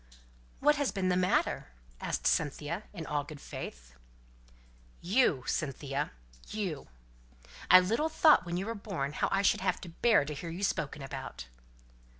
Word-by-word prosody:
"What 295 +1 +4
has 285 -2 +1
been 190 -2 0
the 180 - +3
matter?" 180 0 +1 0.3
asked - - -3
Cynthia, 155 +6 0
in 170 -5 -7
all 145 -1 -1
good 145 0 -10
faith. - - -8 1.1
"You! 180 - +2
Cynthia 140 -1 -2 0.4
you! 190 -9 -4 0.8
I 185 - +10
little 230 +12 0
thought 315 - +5
when 175 0 -3
you 190 - -2
were 230 - -2
born 195 -10 -4
how - - 0
I 195 0 +2
should - - +3
have 185 -1 0
to 175 - -8
bear 205 0 +3
to 150 - -4
hear 165 +4 -6
you 175 +4 -5
spoken 145 -6 -1
about." 135 - -7
175 Hz, 155 wpm, -31 LUFS, 145-200 Hz, 1.1 s, I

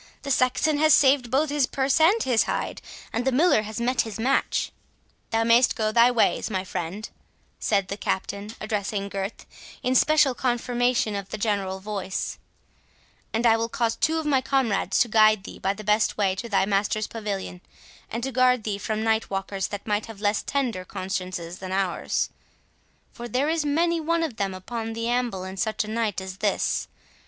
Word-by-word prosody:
The 280 - -3
Saxon 270 +4 +2
hath 310 -1 +5
saved 265 -3 +4
both 280 +4 +1
his 290 -3 +2
purse 270 +2 +1
and 390 +8 +5
his 245 -4 +2
hide, - - -3 0.3
and 230 - 0
the 265 - +1
Miller 290 -2 +4
has 215 +1 -6
met 240 0 +2
his 220 -2 -6
match." 265 +4 +1 0.6
"Thou 225 0 +1
mayst 235 +2 +4
go 215 -1 0
thy 235 +2 +6
ways, 240 -1 +1
my 190 -3 -2
friend," 185 +3 -5 0.5
said 200 -3 +1
the 200 - -4
Captain, 200 +1 -3
addressing 205 -1 -2
Gurth, 195 +1 -5 0.4
in 255 - +1
special 300 0 +4
confirmation 245 -2 0
of 200 -1 -5
the - - -4
general 200 -3 -1
voice, 195 -2 -4 0.9
"and 225 +2 0
I 225 -1 +6
will 230 0 -2
cause 230 -1 0
two 320 +1 +1
of 320 - -2
my 275 -3 +3
comrades 230 -9 +1
to 240 - +3
guide 215 -2 +4
thee - - -10
by 195 +1 0
the 215 - -9
best 210 +1 +2
way 195 -3 +2
to 230 +5 -6
thy 200 -2 +2
master's 205 +2 0
pavilion, 200 -5 -5 0.5
and 230 +1 -4
to 270 - -2
guard 250 -2 +3
thee 205 -2 -3
from 215 +1 -2
night 225 0 +1
walkers 195 0 -2
that 205 -1 -7
might 210 0 -1
have 225 -3 -10
less 205 0 +1
tender 250 -10 -2
consciences 185 -2 -5
than 185 -1 -6
ours; 190 -2 -1 0.8
for 240 0 -7
there 255 +6 0
is 325 -1 +1
many 335 +3 +1
one 335 +1 +1
of 280 -9 -4
them 195 -2 -2
upon 225 +4 -5
the 230 +1 -3
amble 240 -6 -1
in 190 +1 -7
such 220 +3 0
a - - -9
night 220 -3 -1
as 190 0 -7
this. 205 0 0
220 Hz, 190 wpm, -25 LUFS, 200-255 Hz, 0.9 s, thy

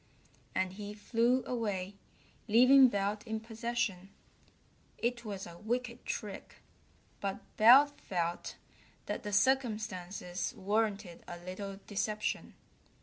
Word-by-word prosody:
And 185 0 0
he 205 +1 -7
flew 235 +4 +2
away, 205 -6 -2 0.5
leaving 255 +4 +8
Belt 205 -1 -1
in 220 0 -2
possession. 225 -4 -3 0.9
It 235 0 -1
was 200 -3 -5
a 170 0 -11
wicked 240 +2 -3
trick, 210 -3 -5 0.6
but 195 -1 -3
Belt 275 +6 +7
felt 170 -2 -2 0.5
that - - -3
the 210 - -5
circumstances 205 -6 0
warranted 205 -2 -1
a 175 - -6
little 195 +3 -7
deception. 210 +1 -2
210 Hz, 105 wpm, -32 LUFS, 195-235 Hz, 0.9 s, leaving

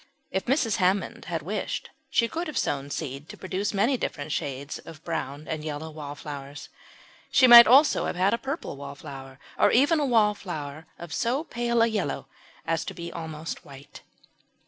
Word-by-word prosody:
If 190 - -1
Mrs. 240 -5 +2
Hammond 190 -1 0
had 165 -3 -3
wished 205 +6 -3 0.2
she 230 - +3
could 335 +6 -4
have 305 - -5
sown 140 0 -1
seed 145 0 -5
to - - -9
produce 190 +2 -2
many 225 +7 +2
different 150 -8 -4
shades 140 0 -3
of 160 -1 -12
brown 150 -3 -4
and 155 -1 -4
yellow 155 +1 -5
Wallflowers. 145 -1 -8 0.6
She 270 - +5
might 240 -1 +11
also 270 +4 +5
have - - -3
had 185 +2 +2
a 230 - 0
purple 270 - -5
Wallflower, 135 -2 -9 0.2
and - - +5
even 290 +6 +4
a 290 - +1
Wallflower 180 - 0
of 170 -2 -8
so 250 +6 0
pale 235 -6 +1
a - - +6
yellow 210 -10 -2 0.4
as 165 -1 0
to - - -6
be 170 0 -7
almost 160 -1 -6
white. 140 0 -13
170 Hz, 170 wpm, -26 LUFS, 145-230 Hz, 0.6 s, might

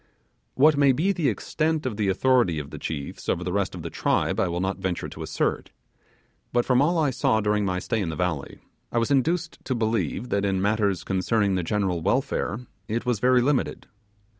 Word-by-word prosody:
What 150 +2 +5
may 140 -2 +5
be 170 +9 +1
the 170 -7 +1
extent 155 - -1
of 125 -5 -2
the 105 -1 0
authority 100 -3 +3
of 75 -1 -6
the 75 - -7
chiefs 70 -2 -5
over 90 - 0
the 90 0 -3
rest 100 -1 -1
of - - -7
the - - -5
tribe, - - 0
I - - +2
will 85 0 -2
not 95 +1 -2
venture 95 -2 -2
to - - -9
assert; - - -1 0.8
but 120 0 +2
from 125 0 +3
all 170 +4 +2
I 150 -4 +2
saw 130 -3 +2
during 105 -1 +1
my 90 -1 0
stay 110 +4 -1
in 90 - -2
the 80 - -4
valley, 80 -4 -3 0.3
I - - -1
was 115 +3 +1
induced 165 +5 +1
to 130 - -2
believe 110 -1 -1
that 100 0 0
in 95 -2 +1
matters 100 -2 +1
concerning 100 +2 +1
the 90 - +1
general 95 -1 -1
welfare 130 - 0 0.3
it 115 +2 -2
was 120 -4 0
very 125 +1 +4
limited. 140 0 0
110 Hz, 210 wpm, -25 LUFS, 95-130 Hz, 0.8 s, What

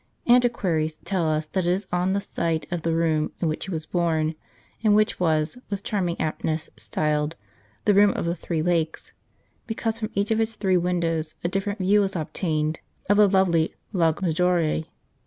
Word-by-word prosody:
Anti 245 0 +5
quaries 160 -8 -1
tell 180 -5 0
us 155 0 0
that 180 +3 -2
it - - +3
is 185 +2 0
on 180 +1 +1
the 200 - 0
site 165 -5 -2
of 175 -1 -2
the 165 - 0
room 160 -2 +1
in 170 - 0
which 155 - -2
he - - -5
was 160 -2 -3
born, 160 -2 0 0.5
and 210 -2 +5
which 215 0 +2
was, 160 +5 +1
with 200 -1 -4
charming 180 -6 -1
aptness, 155 0 -2
styled 150 +1 -1 0.2
" 105 +2 -35
the 205 - +5
room 205 +1 +6
of - - -3
the 170 - 0
three 165 -2 -3
lakes," 165 -2 -1 0.5
because 225 0 -2
from 215 -1 -3
each 200 +2 0
of 220 - +2
its 225 0 -1
three 190 -3 +1
windows 170 -3 0
a - - +1
different 195 +3 -2
view 200 +2 +3
was 195 -1 -1
obtained 155 -1 -1 0.3
of 205 - +4
the 210 -1 +6
lovely 180 -4 +2 0.2
Lago 170 0 +1
Maggiore. 165 -2 +1
175 Hz, 195 wpm, -25 LUFS, 160-195 Hz, 0.5 s, room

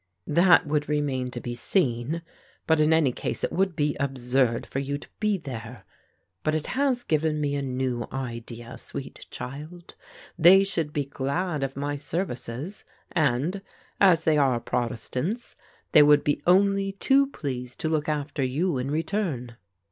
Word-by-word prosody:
"That 175 +3 +5
would 150 0 -1
remain 140 -4 0
to 125 - -5
be 120 0 -5
seen, 130 +2 0 0.4
but 160 -1 +3
in 155 +1 +4
any 160 -5 +4
case - - -4
it - - 0
would 190 -1 0
be 145 0 0
absurd 130 -3 +1
for 135 - -3
you 140 +1 -2
to - - -12
be 210 -2 +1
there. 125 -6 -8 0.6
But 155 0 0
it 155 - -2
has 260 -2 +1
given 155 0 +1
me 145 -1 0
a 145 - -1
new 130 -2 -2
idea, 120 -2 -6
sweet 135 - -8
child. 155 +7 -8 0.5
They 190 +4 +8
would 160 -3 -1
be 145 -2 -1
glad 145 +4 -2
of 135 0 -3
my 145 +1 -2
services; 150 - -4 0.3
and, 155 +4 +1 0.4
as 175 -5 +5
they 155 -2 +3
are 130 -4 +3
protestants, 125 - -3 0.4
they 150 - +8
would 145 0 +6
be 145 -1 0
only 195 +1 +3
too 270 +7 +3
pleased 125 - -5
to - - 0
look 155 -1 0
after 145 -1 -2
you 140 +4 0
in 130 +2 -2
return." 155 - -2
145 Hz, 160 wpm, -26 LUFS, 130-170 Hz, 0.6 s, They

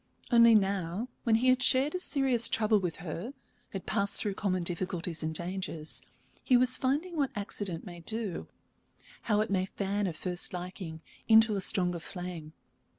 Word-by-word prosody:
Only 235 -1 +7
now, 195 +2 -1 0.2
when 225 -2 +3
he 250 +3 +2
had 255 0 +3
shared 265 +3 +4
a 365 - -2
serious 265 -8 +2
trouble 215 -1 +2
with 180 -4 -3
her, 180 - -6 0.3
had 195 - -7
passed 200 0 +3
through 205 - -2
common 185 -2 -2
difficulties 175 -1 -2
and 160 0 -2
dangers, 170 -2 -3 0.4
he 255 - +4
was 255 +1 +5
finding 295 +7 -1
what 280 -3 +1
accident 200 -4 -4
may 175 -3 -9
do 215 +1 -3 0.8
how 210 -1 +3
it 215 - -3
may 190 -1 0
fan 200 +1 -2
a 175 - -3
first 180 +3 -3
liking 180 -2 -7 0.3
into 220 -1 +5
a 195 - -2
stronger 180 -2 +4
flame. 175 -3 -8
195 Hz, 165 wpm, -29 LUFS, 175-230 Hz, 0.8 s, Only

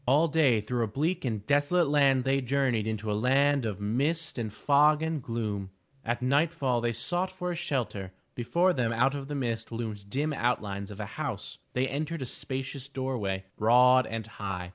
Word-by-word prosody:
All 145 +6 +4
day 145 -8 +3
through 120 +3 -2
a - - 0
bleak 150 - -1
and 110 -4 -2
desolate 145 +5 +3
land 140 -3 +4
they 135 +1 +1
journeyed 130 -4 0
into 110 -1 -2
a - - +1
land 135 +3 +2
of 100 -3 -4
mist 140 +9 -1
and 110 -3 -3
fog 150 +6 +3
and 160 -2 -1
gloom. 110 -5 -3 0.3
At 120 +1 -2
nightfall 140 -2 +1
they 120 0 +1
sought 175 - -1
for 180 -1 -4
a - - -3
shelter. 105 - -2 0.2
Before 170 +10 +2
them 125 -6 0
out 125 +4 +2
of 140 -1 -5
the 145 - -4
mist 115 -4 -3
loomed 110 -3 -5
dim 150 +6 -1
outlines 105 -6 -1
of 105 0 -9
a 105 - -3
house. - - -5
They 130 +1 +1
entered 150 +2 -3
a - - -4
spacious 135 +1 -5
door 130 -1 -3
way, 95 -2 -2
broad 125 +3 +5
and 115 -1 -4
high. 95 -5 -5
125 Hz, 190 wpm, -29 LUFS, 110-145 Hz, 0.3 s, broad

